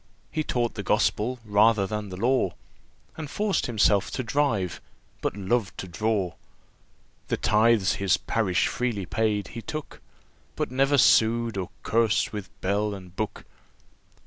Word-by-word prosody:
He 155 - -1
taught 120 -5 -1
the - - -4
Gospel 125 +5 +1
rather 105 0 +4
than 105 +1 -4
the 90 - -7
law, 120 -4 +1 0.6
And 155 -3 -6
forced 205 +4 0
himself 105 -4 +3
to 130 - -2
drive, 115 - 0 0.4
but - - -2
loved 100 +1 -1
to 95 - -5
draw. 95 0 -1 0.9
The - - 0
tithes 110 -2 +3
his 100 -1 +3
parish 100 -6 0
freely 115 -6 -2
paid, 105 +2 0
he 115 - -7
took; 155 +5 -7 0.5
But - - -2
never 135 +2 +3
sued, 115 -2 +4
or 95 -2 -3
curs'd 115 -1 +2
with 105 -4 -6
bell 100 +2 0
and 90 -2 -12
book. 110 +1 -4
110 Hz, 145 wpm, -26 LUFS, 100-120 Hz, 0.9 s, rather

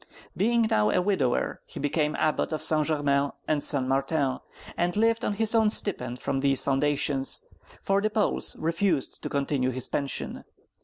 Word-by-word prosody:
Being 230 +3 +2
now 105 - +2
a 180 - +2
widower, 180 -10 0
he - - -9
became 150 +1 0
Abbot 155 +1 0
of 155 - -2
St. 155 -1 +2
Germain 145 -2 +1
and 150 -2 +1
St. 140 -3 +2
Martin, 135 0 0 0.4
and 175 +2 -1
lived 230 +2 +2
on - - 0
his 220 +1 +1 0.2
stipend 125 - -1
from 135 - -2
these 135 -1 +1
foundations, 140 0 +1 0.4
for 195 0 +2
the 215 - +1
Poles 215 -1 0
refused 165 -1 0
to - - -4
continue 140 -2 0
his 130 0 -3
pension. 140 -1 -3
150 Hz, 160 wpm, -26 LUFS, 135-190 Hz, 0.4 s, Being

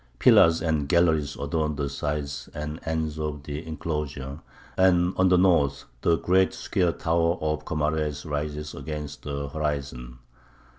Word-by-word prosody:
Pillars 80 +4 +6
and 80 -4 0
galleries 80 -4 +3
adorn 75 +1 -1
the 70 0 -2
sides 70 0 -3
and 75 +1 -5
ends 80 -1 -2
of 75 -2 -3
the 75 +2 -5
enclosure, 75 -3 -4 0.4
and 90 -1 +4
on 95 0 +4
the 90 - +5
north 75 -7 +3 0.2
the 85 - +3
great 95 +2 +2
square 90 -2 0
tower 85 +1 +1
of 75 0 -2
Comares 75 -1 -1
rises 75 0 -3
against 75 -2 -6
the 70 -1 -4
horizon. 70 -5 -3
75 Hz, 140 wpm, -26 LUFS, 70-80 Hz, 0.4 s, Pillars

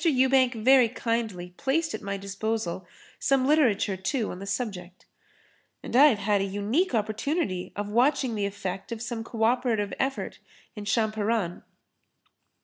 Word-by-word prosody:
Ewbank 260 -4 +3
very 250 +1 +5
kindly 220 -7 -3
placed 310 +4 0
at - - -5
my 200 0 -3
disposal 195 -2 -3 0.3
some 270 -1 +2
literature 250 -9 +3
too 210 +5 -2
on 180 - -7
the 200 - -7
subject. 190 -5 -5 0.8
And - - -5
I 275 +4 +8
have 250 -8 +3
had 200 0 +1
a - - +1
unique 210 - 0
opportunity 215 - -1
of 205 0 -3
watching 250 +3 +2
the 205 -2 -1
effect 195 0 -5
of 230 - -4
some 230 -1 -4
[Pg 230 - -16
24]co - - +2
operative 230 -4 +1
effort 265 0 -2 0.4
in 210 -1 -7
Champaran. 215 -3 0
220 Hz, 150 wpm, -27 LUFS, 200-255 Hz, 0.8 s, I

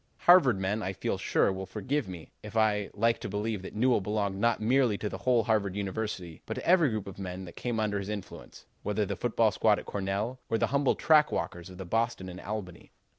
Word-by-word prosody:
"Harvard 140 - +6
men, 100 +3 -1
I 95 -1 -2
feel - - -2
sure, 95 - +2
will 95 0 -6
forgive 115 +7 -2
me 90 -4 -9
if 105 +1 -6
I 105 -2 +2
like 115 +2 +2
to - - -5
believe 105 0 -2
that 95 - -9
Newell 120 0 +3
belonged 100 -1 -1
not 115 +2 +2
merely 120 -1 +2
to 105 - -3
the - - -6
whole 125 -3 +3
Harvard 105 -4 +1
University, 100 -4 -4
but - - -3
to - - -6
every 170 -4 +5
group 110 -3 -3
of 100 0 -9
men 95 0 -5
that 85 - -11
came 120 -2 -2
under 105 -2 0
his 100 +1 -5
influence, 105 -2 -8 0.2
whether 105 0 0
the - - -3
football 115 -2 +2
squad 105 -1 +3
at - - -7
Cornell 100 +6 -2
or 115 - +2
the 115 - +2
humble 140 -1 +3
track 155 -1 +4
walkers 85 +1 -3
of 90 - -11
the 95 - -6
Boston 115 -1 -1
and 90 0 -8
Albany. 100 -4 -6
105 Hz, 230 wpm, -29 LUFS, 95-115 Hz, 0.2 s, Harvard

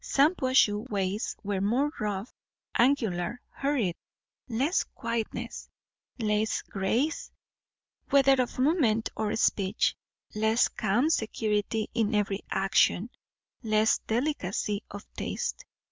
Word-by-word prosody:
Shampuashuh 260 - +3
ways 200 0 -1
were 200 -2 -1
more 250 +9 +1
rough, 210 +1 -3 0.4
angular, 235 -5 +1
hurried; 265 -11 0 0.5
less 265 +10 +1
quietness, 230 -2 -4 0.5
less 215 -1 0
grace, 230 +11 -1 0.8
whether 275 -1 +5
of 245 - -4
movement 255 -6 +2
or 215 -1 -1
speech; 200 -2 +1 0.4
less 220 +2 +2
calm 235 +9 +1
security 215 -3 0
in 220 -2 +1
every 200 -1 0
action; 195 +3 +2 0.5
less 215 -2 +2
delicacy 220 -5 -1
of 205 +1 -8
taste. - - -4
220 Hz, 100 wpm, -28 LUFS, 205-255 Hz, 0.8 s, whether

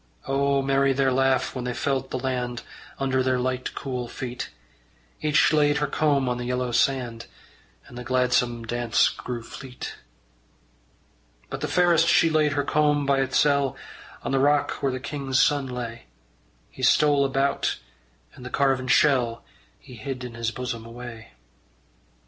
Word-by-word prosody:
O 140 0 +1
merry 135 0 +2
their 135 0 +2
laugh 130 0 +1
when 125 - -4
they 125 -1 -3
felt 135 -1 -1
the - - -3
land 125 -2 -3 0.3
Under 135 -1 0
their 130 0 +1
light 130 0 -2
cool 125 -3 -4
feet! 125 +1 -6 0.7
Each 155 +1 +3
laid 150 -1 +3
her 150 - +1
comb 145 -2 +1
on 125 0 -1
the 120 - -4
yellow 125 0 -1
sand, 120 -2 0 0.6
And - - -14
the 125 - -6
gladsome 125 -2 +1
dance 115 -4 +2
grew 120 -2 -6
fleet. 130 +1 -8 1.5
But - - -5
the - - -1
fairest 170 -2 +3
she 165 - +4
laid 155 -2 +2
her 145 0 0
comb 150 0 +2
by 140 0 +2
itsel' 140 0 +2 0.5
On - - -3
the 135 - +2
rock 145 +1 +3
where 135 - +1
the 130 - -4
king's 135 -1 -2
son 145 -2 +3
lay. 120 -2 -6 0.7
He - - -11
stole 145 +2 +4
about, 135 0 0 0.6
and - - -13
the 125 - -6
carven 135 -1 +1
shell 125 -4 +3 0.3
He 125 - -15
hid 125 +3 -5
in 125 -1 -7
his 115 0 -2
bosom 120 -2 -5
away. 115 - -10
130 Hz, 155 wpm, -25 LUFS, 125-140 Hz, 1.5 s, she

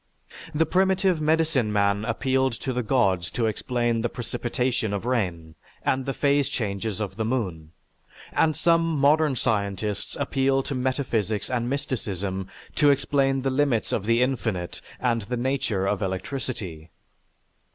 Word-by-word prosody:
The 160 +2 +3
primitive 190 0 +2
medicine 155 -7 +2
man 100 0 +2
appealed 130 +2 +1
to 130 - -2
the 125 - 0
gods 100 -8 +2
to 120 - -1
explain 120 +1 0
the 120 - 0
precipitation 120 -2 -2
of 100 - -4
rain 90 -10 -1 0.3
and 130 0 0
the 135 - 0
phase 140 -1 +2
changes 105 -4 -3
of 100 -2 -4
the 110 - 0
moon, 95 -10 -2 0.6
and 155 -2 +3
some 165 -1 +3 0.2
modern 150 0 +4
scientists 105 -3 -1
appeal 135 0 +1
to 140 - -4
metaphysics 125 -5 -1
and 120 -1 0
mysticism 100 -8 -3 0.3
to 145 -1 +5
explain 135 -1 +2
the 135 - +1
limits 130 -4 +1
of 105 - -1
the 115 +1 +4
infinite 110 -9 -2 0.2
and 120 -2 +1
the 120 +5 -3
nature 120 -6 0
of 100 +1 0
electricity." 95 - -4
120 Hz, 140 wpm, -25 LUFS, 105-135 Hz, 0.6 s, to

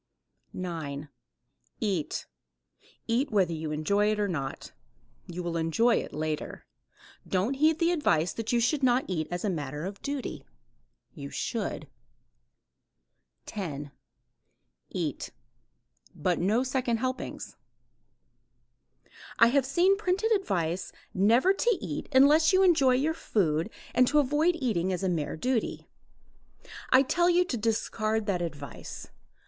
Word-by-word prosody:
9. 155 -5 -5 0.7
EAT. 190 -9 -2 0.8
Eat 250 +5 +1
whether 185 -5 +2
you 155 -1 -4
enjoy 200 +8 +1
it 215 - -1
or 205 - +1
not. 140 -7 -4 0.6
You 180 +1 -5
will 170 -1 -3
enjoy 165 +9 +2
it - - -4
later. 155 0 -4 0.6
Don't 195 +7 0
heed 310 +3 +3
the 335 +1 +2
advice 175 - +1
that 225 -1 -3
you 240 - +3
should 275 +5 +1
not 255 0 +3
eat 160 -4 -2
as 175 +3 -3
a - - +1
matter 150 -1 -4
of 200 +1 -7
duty. 280 -2 -4 0.7
You 70 - -8
should. - - -3 1.6
10. 145 -8 -5 1.0
EAT. - - -3 0.9
But 175 +3 0
no 215 +8 +2
second 255 -2 0
helpings. 255 +2 -4 1.8
I 230 - +7
have 265 0 +2
seen 360 +8 +3
printed 405 +2 0
advice 185 - 0 0.2
never 235 - +4
to 465 +1 +1
eat 165 -8 -5
unless 295 +4 +6
you 380 0 +4
enjoy 285 -9 +5
your 295 +5 +1
food 170 - 0 0.2
and 250 0 +4
to 300 - +2
avoid 295 +5 +3
eating 210 - 0
as 185 +1 -2
a 190 - +1
mere 160 -3 -2
duty. 250 +5 -1 1.0
I 260 +1 +6
tell 345 +6 +2
you 355 +1 +4
to 280 - -3
discard 220 -1 -1
that 185 -3 -1
advice. 145 -6 -7
220 Hz, 130 wpm, -28 LUFS, 170-275 Hz, 1.8 s, I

